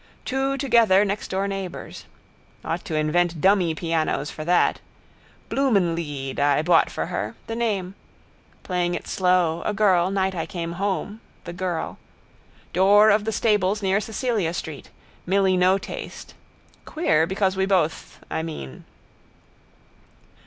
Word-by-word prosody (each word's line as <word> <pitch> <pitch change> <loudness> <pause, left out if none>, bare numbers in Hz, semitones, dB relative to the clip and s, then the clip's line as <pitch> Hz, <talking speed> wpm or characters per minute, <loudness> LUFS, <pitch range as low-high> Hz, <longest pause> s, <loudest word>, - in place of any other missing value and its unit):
Two 270 +1 -1
together 230 -7 +4
nextdoor 195 -1 -2
neighbours. 195 -2 -6 0.6
Ought 165 +2 -3
to 160 - -3
invent 165 +2 +1
dummy 185 -2 +3
pianos 160 -3 -1
for 155 - -7
that. 175 +2 +2 0.7
Blumenlied 170 - 0
I 145 +1 +3
bought 170 0 +4
for - - -3
her. - - -4
The 225 - -5
name. 200 -6 -1 0.7
Playing 175 -1 -1
it - - -6
slow, 180 -3 +1
a 210 - -2
girl, 190 -4 +3
night 190 -1 0
I 165 -3 -3
came 170 -2 -4
home, 195 +3 -3 0.2
the 175 - -7
girl. 180 -3 -3 0.7
Door 205 +4 +6
of 210 +1 +2
the 220 - 0
stables 210 -2 +1
near 195 +1 +2
Cecilia 215 -6 -2
street. 155 -5 -7 0.4
Milly 190 0 +3
no 185 +1 +4
taste. 195 - -8 0.5
Queer 165 - +1
because 190 0 0
we 190 0 0
both, 175 -5 -1
I - - -3
mean. 110 - -7
185 Hz, 130 wpm, -23 LUFS, 165-205 Hz, 0.7 s, Door